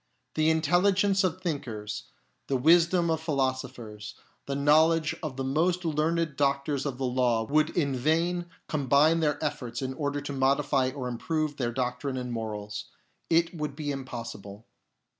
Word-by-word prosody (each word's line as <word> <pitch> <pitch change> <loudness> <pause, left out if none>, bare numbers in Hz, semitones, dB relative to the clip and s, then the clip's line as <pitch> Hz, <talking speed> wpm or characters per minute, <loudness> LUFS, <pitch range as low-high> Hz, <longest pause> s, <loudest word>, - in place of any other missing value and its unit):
The 155 0 +2
intelligence 190 +5 +3
of 185 0 -1
thinkers, 115 - -4 0.4
the 135 - +1
wisdom 170 +4 +4
of 160 -1 0
philosophers, 130 -7 -3 0.3
the 140 - -2
know 150 +3 +5
ledge 165 -2 0
of 150 -5 -5
the 135 - -2
most 170 +7 +1
learned 160 0 0
doctors 140 0 0
of 130 -3 -4
the 135 - -2
law 125 -2 +1
would 155 +6 +2
in 140 -5 +1
vain 165 +6 +1 0.2
combine 150 +3 +3
their 150 -2 +1
efforts 120 -5 -3
in 130 -1 -3
order 145 +1 -2
to 145 0 -5
modify 135 0 +2
or 130 -1 -5
improve 155 +4 -2
their 120 -3 -1
doctrine 130 +2 -2
and 125 -1 -4
morals; 105 -3 -4 0.4
it 165 +1 +3
would 150 -4 -4
be 145 -1 -3
impossible. 115 -6 -7
140 Hz, 155 wpm, -28 LUFS, 130-160 Hz, 0.4 s, know